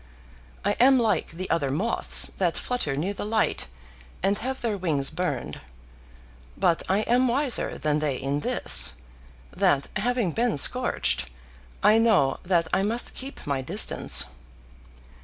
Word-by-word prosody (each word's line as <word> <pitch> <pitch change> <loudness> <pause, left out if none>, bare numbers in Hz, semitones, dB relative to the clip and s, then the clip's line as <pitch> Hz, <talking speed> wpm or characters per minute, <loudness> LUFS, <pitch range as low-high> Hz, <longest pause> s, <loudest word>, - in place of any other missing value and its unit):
I 205 - +2
am 265 +2 +6
like 230 -3 0
the 185 +3 -6
other 145 -5 0
moths 190 +13 +2
that 175 -3 0
flutter 245 - -1
near 175 +8 -2
the - - -6
light 215 - -1 0.6
and 200 +1 +1
have 260 +2 -5
their 225 -3 -2
wings 155 -8 -1
burned. 150 - -4 1.0
But 175 -3 +1
I 195 +3 +2
am 245 +3 +1
wiser 260 +1 0
than 150 0 -1
they 150 -3 -2
in 140 +2 -3
this, - - +4 0.6
that 140 -1 +1
having 235 -2 -1
been 235 -1 -1
scorched, - - +2 0.6
I 215 +1 +5
know 210 -13 +2
that 175 -2 0
I - - +2
must 225 +4 -2
keep 270 +2 -8
my 140 -2 -2
distance. 130 - +2
190 Hz, 140 wpm, -25 LUFS, 150-230 Hz, 1.0 s, am